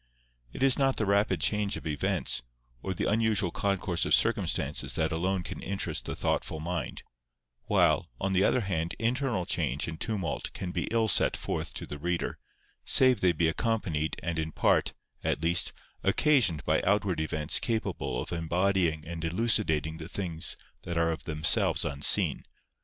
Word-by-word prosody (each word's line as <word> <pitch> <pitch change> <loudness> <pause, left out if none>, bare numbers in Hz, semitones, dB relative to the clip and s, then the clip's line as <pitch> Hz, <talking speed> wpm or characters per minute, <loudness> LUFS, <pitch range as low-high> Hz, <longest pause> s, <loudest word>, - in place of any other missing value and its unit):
It - - -4
is 135 -1 +4
not 135 -1 +2
the 110 - 0
rapid 100 -2 +2
change 100 - +1
of - - -10
events, 75 -4 -1 0.4
or 95 +4 -3
the - - -1
unusual 110 -4 +2
concourse 95 -3 0
of - - +5
circumstances 75 - +1
that 80 +1 0
alone 90 +3 -1
can - - -7
interest 100 0 -3
the - - -4
thoughtful 80 - -1
mind; 85 +3 -4 0.6
while, - - +2
on 95 0 -1
the 95 +1 +3
other 125 - +3
hand, 85 -4 -2
internal 120 -4 0
change 75 -6 -1
and 80 -1 -7
tumult 100 -9 -2
can 90 - -5
be - - -2
ill 115 -1 +2
set 90 - +3
forth - - -3
to - - -5
the 75 - -6
reader, 85 +2 -2 0.4
save 130 -5 +4
they 90 - +4
be 85 0 +1
accompanied 85 -5 -1
and 85 -1 -2
in 80 0 -2
part, - - +2 0.3
at 75 - -1
least, 85 +1 +3 0.3
occasioned 105 - +3
by - - +2
outward 100 -4 +1
events 75 0 0
capable 115 -2 -2
of - - -10
embodying 85 -1 +1
and 80 0 -6
elucidating 80 -5 +1
the 80 +1 -7
things 85 -5 -2 0.2
that 85 -1 -4
are 85 0 +2
of 80 - -5
themselves 80 -2 +2
unseen. 70 +1 +3
90 Hz, 165 wpm, -29 LUFS, 80-105 Hz, 0.6 s, of